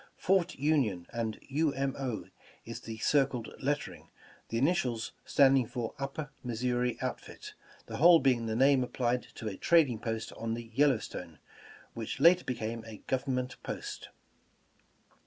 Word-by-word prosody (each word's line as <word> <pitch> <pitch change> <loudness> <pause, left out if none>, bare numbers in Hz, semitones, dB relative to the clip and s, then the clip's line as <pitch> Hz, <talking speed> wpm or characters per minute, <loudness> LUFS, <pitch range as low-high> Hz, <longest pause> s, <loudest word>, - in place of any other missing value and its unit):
"Fort 180 0 +2
Union" 130 - +1
and 115 -2 -2
"U. 150 +1 +1
M. 135 0 -1
O." 130 -5 -3 0.4
is - - -6
the 115 -1 -7
circled 130 -1 +1
lettering, 145 +2 -3 0.4
the 115 - -1
initials 125 -5 +1
standing 135 -3 +4
for 120 -2 -4
"Upper 140 +2 -4
Missouri 125 0 -1
Outfit," - - -6 0.3
the - - -6
whole 170 +3 +8
being 125 -5 +2
the 110 - -1
name 135 +1 +5
applied 125 0 0
to 110 - -6
a 100 - -4
trading 150 -10 +4
post 115 -1 -4
on 115 0 -3
the 115 -1 -8
Yellowstone, 135 -2 0 0.6
which 115 -2 -5
later 175 +2 +6
be 125 - -2
came 115 0 -4
a 110 -1 -9
Government 130 -1 -1
post. - - -6
125 Hz, 145 wpm, -31 LUFS, 115-140 Hz, 0.6 s, whole